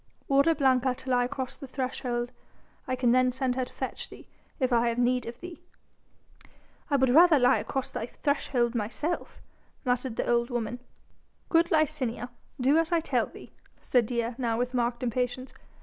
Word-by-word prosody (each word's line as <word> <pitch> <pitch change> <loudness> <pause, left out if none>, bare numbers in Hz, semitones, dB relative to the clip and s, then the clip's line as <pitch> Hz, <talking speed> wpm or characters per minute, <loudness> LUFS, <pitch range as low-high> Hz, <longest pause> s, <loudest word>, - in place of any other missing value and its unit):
"Order 280 +4 +4
Blanca 260 -3 +2
to 260 +1 -6
lie 245 -1 +3
across 260 0 -4
the 275 - -9
threshold. 250 -2 -3 0.6
I 255 - 0
can 250 -2 +2
then 255 0 +4
send 255 -1 -1
her 255 -1 -1
to - - -15
fetch - - -5
thee, - - -13 0.3
if 255 -2 +1
I 235 0 +3
have 230 - -2
need 245 0 +1
of 235 +1 -7
thee." 355 -1 -9 1.3
"I 285 - +2
would 265 -2 +3
rather 330 +2 +7
lie 245 -2 +4
across 270 -2 -3
thy 225 - -4
threshold 245 -4 0
myself," 240 +9 -3 0.5
muttered 250 -1 0
the - - -2
old 235 0 +2
woman. 240 -1 -3 0.7
"Good 335 0 +4
Licinia, 280 - 0 0.3
do 275 +5 +4
as 330 0 0
I 340 - +4
tell 325 - 0
thee," - - -13 0.3
said 245 -4 +2
Dea, 235 -1 -1
now 230 -3 0
with 250 +1 -1
marked 240 0 -1
impatience. 250 +2 -2
255 Hz, 175 wpm, -28 LUFS, 240-275 Hz, 1.3 s, rather